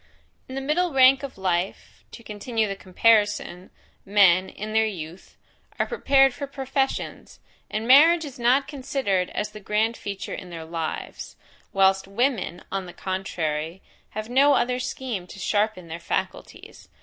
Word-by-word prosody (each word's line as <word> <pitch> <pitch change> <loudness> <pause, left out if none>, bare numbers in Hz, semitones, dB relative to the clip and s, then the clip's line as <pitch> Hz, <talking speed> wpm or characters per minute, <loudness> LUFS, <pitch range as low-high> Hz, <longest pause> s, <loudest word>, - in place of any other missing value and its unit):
In 260 - -6
the 270 - -3
middle 315 +4 0
rank 265 0 +6
of 275 -6 -7
life, 185 -1 -2
to 235 - -11
continue 220 +1 -2
the 195 - -4
comparison, 205 -1 +1 0.3
men, 190 -2 +4
in 215 +1 -7
their 220 0 +4
youth, 175 -3 -8 0.4
are - - +1
prepared 270 - +3
for 280 - -6
professions, 270 0 -3 0.3
and 220 +2 -3
marriage 320 +5 +7
is 275 -3 -10
not 255 +4 +3
considered 260 -10 -1
as 210 0 -3
the 215 - -10
grand 215 +3 0
feature 200 -3 -6
in 180 - -7
their 165 -2 -7
lives; 165 -1 -5 0.4
whilst 195 0 +3
women, 225 -3 -1
on 195 -1 -3
the 175 - -10
contrary, 170 -3 -3 0.3
have 215 0 -3
no 275 +4 +4
other 250 0 +1
scheme 245 -7 -4
to - - -11
sharpen 205 -2 -1
their 165 +1 -6
faculties. 170 - -5
215 Hz, 150 wpm, -24 LUFS, 190-265 Hz, 0.4 s, marriage